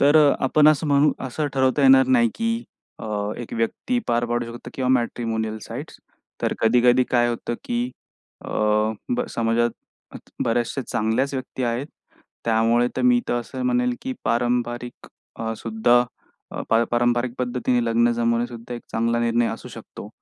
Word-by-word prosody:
तर 145 Hz, +2 st, +5 dB, 0.3 s
आपण 150 Hz, +3 st, +5 dB
असं 155 Hz, +1 st, +2 dB
म्हणू, 145 Hz, +1 st, +4 dB
असं 145 Hz, +4 st, -2 dB
ठरवता 130 Hz, +1 st, +2 dB
येणार 130 Hz, -1 st, +7 dB
नाही, 120 Hz, -3 st, +4 dB
की 230 Hz, +1 st, -1 dB, 0.3 s
अ, -, -, -7 dB, 0.3 s
एक 120 Hz, -, -8 dB
व्यक्ती 115 Hz, -, -1 dB
पार 120 Hz, 0 st, +2 dB
पाडू 120 Hz, 0 st, -1 dB
शकते 120 Hz, +1 st, -9 dB
किंवा 130 Hz, -1 st, -1 dB
मॅट्रिमोनियल 115 Hz, -3 st, -1 dB
साइट्स. -, -, -8 dB, 0.4 s
तर -, -, +1 dB
कधी-कधी 125 Hz, +2 st, +4 dB
काय 120 Hz, -1 st, +3 dB
होतं, 120 Hz, 0 st, -3 dB
की 120 Hz, +1 st, -1 dB, 0.5 s
अ, -, -, -7 dB, 0.7 s
ब 250 Hz, -, 0 dB
समाजात 115 Hz, +1 st, +1 dB, 0.7 s
बऱ्याचशा 120 Hz, +3 st, 0 dB
चांगल्याच 115 Hz, +6 st, 0 dB
व्यक्ती 130 Hz, 0 st, -5 dB
आहेत. 120 Hz, +4 st, -1 dB, 0.6 s
त्यामुळे 115 Hz, +1 st, +3 dB
तर -, -, 0 dB
मी 245 Hz, -1 st, +4 dB
तर -, -, +1 dB
असं 255 Hz, -, -7 dB
म्हणेल, 250 Hz, 0 st, +1 dB
की 260 Hz, +1 st, -3 dB
पारंपरिक 120 Hz, 0 st, -1 dB, 0.3 s
अ, 115 Hz, 0 st, -2 dB
सुद्धा 120 Hz, +2 st, +2 dB, 0.7 s
अपारंपरिक 120 Hz, +1 st, +2 dB
पद्धतीने 125 Hz, -1 st, 0 dB
लग्न 120 Hz, +1 st, +3 dB
जमवणेसुद्धा 115 Hz, 0 st, -2 dB
एक 120 Hz, -, -8 dB
चांगला 115 Hz, +1 st, +1 dB
निर्णय 120 Hz, 0 st, +2 dB
असू -, -, -6 dB
शकतो. -, -, -10 dB
120 Hz, 145 wpm, -23 LUFS, 115-130 Hz, 0.7 s, येणार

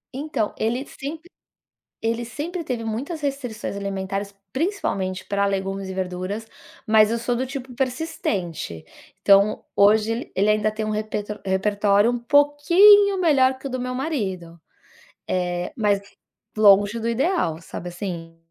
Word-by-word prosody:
Então, 270 Hz, -7 st, -2 dB
ele 240 Hz, +5 st, -1 dB
sempre 315 Hz, +5 st, -8 dB, 0.7 s
ele 230 Hz, +1 st, 0 dB
sempre 325 Hz, +8 st, -5 dB
teve 245 Hz, -4 st, -3 dB
muitas 265 Hz, +9 st, -4 dB
restrições 255 Hz, -8 st, -4 dB
alimentares, 200 Hz, 0 st, -4 dB, 0.2 s
principalmente 200 Hz, -, -2 dB
pra 200 Hz, 0 st, 0 dB
legumes 195 Hz, 0 st, -2 dB
e 190 Hz, -, -5 dB
verduras, 190 Hz, +4 st, -4 dB, 0.4 s
mas 215 Hz, 0 st, +5 dB
eu 235 Hz, -, 0 dB
sou 240 Hz, +1 st, -1 dB
do 260 Hz, +2 st, -1 dB
tipo 260 Hz, -1 st, -7 dB
persistente. 210 Hz, -, -3 dB, 0.4 s
Então, 200 Hz, +1 st, +4 dB
hoje 220 Hz, +3 st, +3 dB
ele 200 Hz, +2 st, +2 dB
ainda 215 Hz, 0 st, +2 dB
tem 215 Hz, 0 st, -3 dB
um 215 Hz, -, -2 dB
repe 215 Hz, 0 st, -2 dB, 0.3 s
repertório 205 Hz, +3 st, +2 dB
um 245 Hz, -, -1 dB
pouquinho 340 Hz, -, +5 dB
melhor 265 Hz, -6 st, +4 dB
que 270 Hz, +1 st, -7 dB
o -, -, -9 dB
do 255 Hz, 0 st, -3 dB
meu 250 Hz, 0 st, -3 dB
marido, 190 Hz, -, -3 dB, 0.7 s
eh, 180 Hz, -1 st, -2 dB
mas 205 Hz, -3 st, +2 dB, 0.6 s
longe 205 Hz, +1 st, +5 dB
do 230 Hz, -, -2 dB
ideal, 235 Hz, -, 0 dB
sabe, 175 Hz, -, -7 dB
assim. 170 Hz, -2 st, -6 dB
220 Hz, 140 wpm, -23 LUFS, 195-265 Hz, 0.7 s, mas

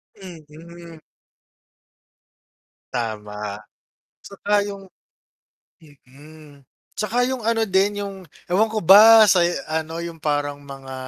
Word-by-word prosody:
Mm. 170 Hz, -1 st, -14 dB, 1.9 s
Tama, 105 Hz, -3 st, -5 dB, 0.6 s
tsaka 205 Hz, +1 st, -2 dB
yung 200 Hz, -1 st, -9 dB, 0.9 s
mm, 145 Hz, -1 st, -18 dB, 0.3 s
tsaka 220 Hz, +4 st, -1 dB
yung 260 Hz, -, -3 dB
ano 230 Hz, 0 st, +1 dB
din 205 Hz, 0 st, 0 dB
yung, 200 Hz, -1 st, -6 dB, 0.4 s
ewan 200 Hz, +5 st, +2 dB
ko 220 Hz, -1 st, -4 dB
ba 215 Hz, +4 st, +7 dB
sa 175 Hz, -2 st, +3 dB, 0.2 s
ano 160 Hz, +1 st, -4 dB
yung 170 Hz, -1 st, -8 dB
parang 145 Hz, -2 st, -2 dB
mga 135 Hz, -2 st, -11 dB
165 Hz, 100 wpm, -21 LUFS, 145-200 Hz, 1.9 s, ba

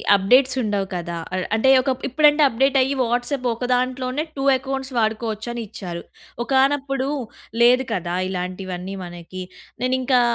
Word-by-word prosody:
అప్డేట్సుండవు 215 Hz, -1 st, +2 dB
కదా! 170 Hz, -1 st, -4 dB, 0.2 s
ఆహ్, 185 Hz, -, -1 dB
అంటే 265 Hz, +4 st, +3 dB
ఒకప్ 260 Hz, -1 st, -2 dB
ఇప్పుడంటే, 295 Hz, +3 st, +4 dB
అప్డేటయ్యి 270 Hz, +2 st, +2 dB
వాట్సాప్ 245 Hz, +3 st, -1 dB
ఓక 240 Hz, +2 st, -3 dB
దాంట్లోనే 255 Hz, +3 st, -1 dB
2 270 Hz, -, -2 dB
ఎకౌంట్స్ 270 Hz, +1 st, -4 dB
వాడుకోవచ్చని 220 Hz, +1 st, -2 dB
ఇచ్చారు. 175 Hz, -4 st, -7 dB, 0.4 s
ఒకానప్పుడు 270 Hz, 0 st, +1 dB, 0.5 s
లేదు 250 Hz, +2 st, +5 dB
కదా 175 Hz, -3 st, -2 dB
ఇలాంటివన్నీ 185 Hz, 0 st, -5 dB
మనకి. 175 Hz, +1 st, -8 dB, 0.4 s
నేనింకా 255 Hz, 0 st, +2 dB
245 Hz, 115 wpm, -22 LUFS, 195-265 Hz, 0.5 s, లేదు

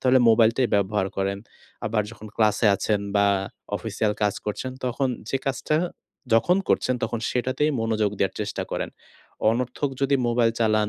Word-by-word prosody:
তাহলে 130 Hz, 0 st, +5 dB
মোবাইলটাই 115 Hz, +2 st, +4 dB
ব্যবহার 100 Hz, -1 st, +1 dB
করেন। 100 Hz, 0 st, -1 dB, 0.5 s
আবার 105 Hz, -1 st, +1 dB
যখন 110 Hz, -2 st, -11 dB
ক্লাসে 110 Hz, +1 st, +3 dB
আছেন 105 Hz, +1 st, 0 dB, 0.2 s
বা 100 Hz, 0 st, +4 dB, 0.5 s
অফিসিয়াল 105 Hz, -1 st, -1 dB
কাজ 105 Hz, -1 st, +2 dB
করছেন। 115 Hz, +5 st, -3 dB
তখন 130 Hz, +2 st, 0 dB, 0.2 s
যে -, -, +2 dB
কাজটা 135 Hz, +3 st, 0 dB, 0.6 s
যখন 175 Hz, +11 st, +4 dB
করছেন 130 Hz, -, +2 dB, 0.4 s
সেটাতেই 130 Hz, +4 st, 0 dB
মনোযোগ 110 Hz, -2 st, +1 dB
দেওয়ার 95 Hz, -, 0 dB
চেষ্টা -, -, -3 dB
করেন। -, -, -2 dB, 0.6 s
অনর্থক 125 Hz, +4 st, -1 dB
যদি 140 Hz, 0 st, +3 dB
মোবাইল 120 Hz, -1 st, +3 dB
চালান 110 Hz, -2 st, +3 dB
115 Hz, 145 wpm, -25 LUFS, 105-130 Hz, 0.6 s, তাহলে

